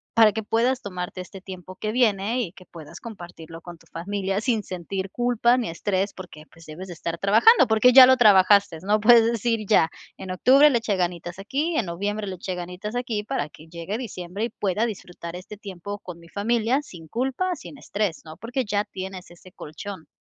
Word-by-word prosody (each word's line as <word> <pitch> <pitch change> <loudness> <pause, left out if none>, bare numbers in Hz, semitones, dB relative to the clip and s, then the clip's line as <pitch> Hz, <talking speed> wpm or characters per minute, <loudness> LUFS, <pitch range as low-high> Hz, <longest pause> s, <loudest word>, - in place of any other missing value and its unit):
para 220 -2 +7
que 220 +2 -3
puedas 240 +4 0
tomarte 180 -1 -6
este 190 +1 -11
tiempo 185 -1 -10
que 215 +3 -3
viene 225 0 +1
y 185 - -4
que 185 - -16
puedas 170 0 -12
compartirlo 175 -7 -10
con 175 0 -10
tu - - -23
familia 195 +3 -3
sin 225 -3 0
sentir 190 +1 -5
culpa 240 0 +2
ni 235 -8 -2
estrés 190 +4 -1
porque, 165 -5 -11
pues, 165 -1 -17
debes 165 +5 -9
de 175 - -7
estar 170 +1 -5
trabajando, 235 - +5
porque 225 +3 +5
ya 260 -1 +11
lo 260 0 +5
trabajaste, 200 -5 +5
¿no?, 210 +3 +1
puedes 230 +1 +6
decir: 230 0 0
"Ya, 165 -6 +4 0.3
en 185 - -7
octubre 275 +10 +5
le 235 - +2
eché 215 -3 -1
ganitas 175 0 -3
aquí, 285 +12 -2
en 225 - +1
noviembre 205 +5 -3
le 195 - -5
eché 180 +1 -5
ganitas 180 +6 -6
aquí, 235 -4 -2
para 150 -7 -3
que 155 +2 -16
llegue 175 +7 -5
diciembre 200 -2 -5
y - - -4
pueda 210 +4 -1
disfrutar 175 -4 -8
este 185 +3 -9
tiempo 200 0 -8
con 175 -2 -9
mi 170 0 -17
familia 235 +5 0
sin 170 - -13
culpa, 265 - -1
sin 290 - -11
estrés", 205 -8 -3
¿no?, 155 0 -11
porque 245 +3 -3
ya 205 0 0
tienes 190 -2 -8
ese 175 +1 -16
colchón. 160 +2 -9
200 Hz, 200 wpm, -24 LUFS, 180-230 Hz, 0.3 s, ya